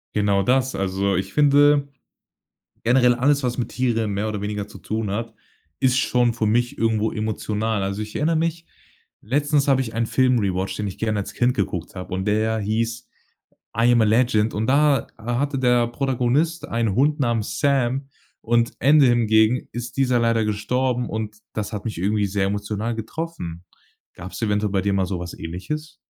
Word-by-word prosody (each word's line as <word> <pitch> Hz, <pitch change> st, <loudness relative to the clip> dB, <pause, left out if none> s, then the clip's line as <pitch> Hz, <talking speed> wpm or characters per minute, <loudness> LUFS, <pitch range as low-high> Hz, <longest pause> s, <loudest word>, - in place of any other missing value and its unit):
Genau 100 Hz, -2 st, +2 dB
das. 130 Hz, +3 st, +1 dB
Also, 95 Hz, 0 st, 0 dB
ich 95 Hz, +1 st, -3 dB
finde 145 Hz, 0 st, +4 dB, 1.0 s
generell 125 Hz, 0 st, +4 dB
alles, 140 Hz, +3 st, +2 dB
was 125 Hz, 0 st, -2 dB
mit 120 Hz, -, -2 dB
Tieren 115 Hz, -4 st, 0 dB
mehr 105 Hz, +2 st, -1 dB
oder 105 Hz, -2 st, -3 dB
weniger 105 Hz, 0 st, -4 dB
zu -, -, -12 dB
tun 110 Hz, -2 st, -3 dB
hat, 115 Hz, +2 st, -4 dB, 0.5 s
ist 130 Hz, 0 st, +3 dB
schon 125 Hz, -3 st, +2 dB
für 110 Hz, -1 st, -1 dB
mich 120 Hz, +3 st, +1 dB
irgendwo 110 Hz, -1 st, +1 dB
emotional. 110 Hz, -1 st, -2 dB
Also, 100 Hz, +2 st, -2 dB
ich 105 Hz, 0 st, -7 dB
erinnere 160 Hz, +2 st, +1 dB
mich, 165 Hz, +1 st, -1 dB, 0.5 s
letztens 145 Hz, +4 st, +1 dB
habe 135 Hz, -1 st, +4 dB
ich 115 Hz, -4 st, -4 dB
einen 115 Hz, 0 st, 0 dB
Film 130 Hz, 0 st, +2 dB
rewatched, 95 Hz, -2 st, -2 dB
den 105 Hz, -, -2 dB
ich 95 Hz, -, -6 dB
gerne 110 Hz, -2 st, -1 dB
als -, -, -6 dB
Kind 125 Hz, +1 st, +2 dB
geguckt 90 Hz, -4 st, -3 dB
habe 90 Hz, -1 st, -6 dB
und 95 Hz, +1 st, -2 dB
der 110 Hz, +1 st, +1 dB
hieß 115 Hz, +2 st, -2 dB, 0.7 s
„I 120 Hz, +1 st, +5 dB
am 120 Hz, -, +4 dB
a -, -, +4 dB
Legend.“ 110 Hz, -1 st, +2 dB
Und 110 Hz, +2 st, -1 dB
da 140 Hz, +1 st, +3 dB
hatte 125 Hz, +5 st, -2 dB
der 125 Hz, -2 st, +3 dB
Protagonist 135 Hz, +6 st, 0 dB
einen 115 Hz, -4 st, 0 dB
Hund 145 Hz, +5 st, +2 dB
namens 115 Hz, -4 st, -1 dB
Sam 135 Hz, -1 st, +1 dB, 0.3 s
und 115 Hz, 0 st, +1 dB
Ende 145 Hz, +1 st, +6 dB
hingegen 115 Hz, 0 st, +3 dB
ist 120 Hz, +2 st, -6 dB
dieser 130 Hz, -3 st, +2 dB
leider 115 Hz, -1 st, +2 dB
gestorben, 125 Hz, +4 st, -1 dB
und 110 Hz, -1 st, -4 dB, 0.2 s
das 105 Hz, 0 st, -4 dB
hat 105 Hz, -2 st, -5 dB
mich 110 Hz, -7 st, -4 dB
irgendwie 105 Hz, +2 st, +1 dB
sehr 95 Hz, 0 st, 0 dB
emotional 105 Hz, +3 st, -2 dB
getroffen. 110 Hz, -, -6 dB, 0.5 s
Gab's 90 Hz, +6 st, -9 dB
eventuell 105 Hz, -1 st, 0 dB
bei 95 Hz, -, +2 dB
dir 100 Hz, -, 0 dB
mal 95 Hz, -1 st, +1 dB
sowas 90 Hz, -2 st, -4 dB
Ähnliches? 150 Hz, -, -6 dB
115 Hz, 175 wpm, -22 LUFS, 105-130 Hz, 1.0 s, Ende